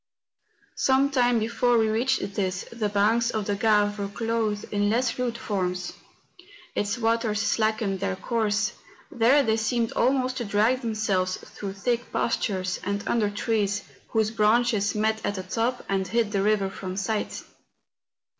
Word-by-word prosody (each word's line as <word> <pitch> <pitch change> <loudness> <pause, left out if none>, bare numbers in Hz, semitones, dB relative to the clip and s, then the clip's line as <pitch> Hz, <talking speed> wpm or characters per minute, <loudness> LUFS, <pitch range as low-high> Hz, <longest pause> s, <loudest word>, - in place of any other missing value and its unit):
Some 270 +1 +3
time 245 -3 +3
before 235 +2 +2
we 220 -1 +3
reached 225 -1 0
this, 185 -2 -2
the 225 -3 -2
banks 220 +4 +2
of 215 -3 -2
the 205 - 0
Grave 205 0 +2
were 200 - -2
clothed 220 0 -1
in 205 0 +1
less 235 +2 0
rude 240 -2 -1
forms; 180 -4 -2 0.8
its 205 +1 -1
waters 225 -2 +1
slackened 215 -3 0
their 195 0 -1
course; 215 +1 0 0.4
there 250 +5 +4
they 220 -3 +1
seemed 230 +1 0
almost 255 0 +1
to 245 - -2
drag 220 +5 +2
themselves 210 -5 0
through 195 -2 -8
thick 240 +4 -2
pastures, 190 -5 -1
and 200 0 -3
under 220 -3 +2
trees, 205 -1 -1 0.2
whose 220 -1 +1
branches 220 -1 +2
met 220 +1 0
at 205 - -1
the 190 - -4
top 230 +6 -2
and 190 -1 0
hid 230 -2 0
the 200 -2 +1
river 200 -1 +1
from 185 -1 -6
sight. 210 +2 -2
215 Hz, 155 wpm, -26 LUFS, 200-235 Hz, 0.8 s, there